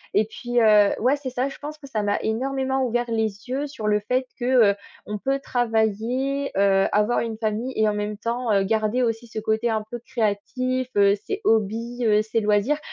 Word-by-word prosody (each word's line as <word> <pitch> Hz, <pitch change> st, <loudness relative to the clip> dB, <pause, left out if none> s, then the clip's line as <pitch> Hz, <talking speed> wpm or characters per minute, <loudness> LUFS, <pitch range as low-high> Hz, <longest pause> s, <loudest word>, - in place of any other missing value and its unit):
Et 210 Hz, +2 st, +4 dB
puis, 240 Hz, +2 st, -2 dB
heu, 210 Hz, -2 st, +5 dB
ouais, 255 Hz, +5 st, +3 dB
c'est 275 Hz, -2 st, -5 dB
ça, 255 Hz, +1 st, -1 dB
je -, -, -10 dB
pense 300 Hz, +1 st, -7 dB
que 290 Hz, -, -13 dB
ça 225 Hz, -5 st, -2 dB
m'a 205 Hz, 0 st, 0 dB
énormément 265 Hz, +3 st, -1 dB
ouvert 240 Hz, +1 st, 0 dB
les 220 Hz, 0 st, -2 dB
yeux 275 Hz, +4 st, -2 dB
sur 260 Hz, -7 st, -7 dB
le 210 Hz, 0 st, +3 dB
fait 250 Hz, +5 st, -1 dB
que, 240 Hz, -, -3 dB, 0.3 s
heu, -, -, -4 dB, 0.3 s
on 210 Hz, 0 st, -4 dB
peut 270 Hz, +4 st, 0 dB
travailler, 245 Hz, +3 st, 0 dB
heu, 195 Hz, -1 st, +4 dB
avoir 210 Hz, +3 st, +2 dB
une 225 Hz, -1 st, -3 dB
famille 220 Hz, +3 st, -2 dB
et 220 Hz, -, +2 dB
en 210 Hz, -, +1 dB
même 210 Hz, 0 st, -3 dB
temps, 235 Hz, +2 st, -2 dB
heu, 195 Hz, -1 st, +3 dB
garder 220 Hz, +4 st, +1 dB
aussi 230 Hz, 0 st, -2 dB
ce 220 Hz, -, -10 dB
côté 220 Hz, +2 st, 0 dB
un 220 Hz, -1 st, 0 dB
peu 240 Hz, -, -4 dB
créatif, 255 Hz, +2 st, -2 dB
heu, 200 Hz, 0 st, +6 dB
ses 405 Hz, +2 st, -3 dB
hobbies, 230 Hz, -, 0 dB
heu, 210 Hz, 0 st, +4 dB
ses 220 Hz, +1 st, -1 dB
loisirs, 210 Hz, +8 st, +2 dB
225 Hz, 210 wpm, -24 LUFS, 210-255 Hz, 0.3 s, heu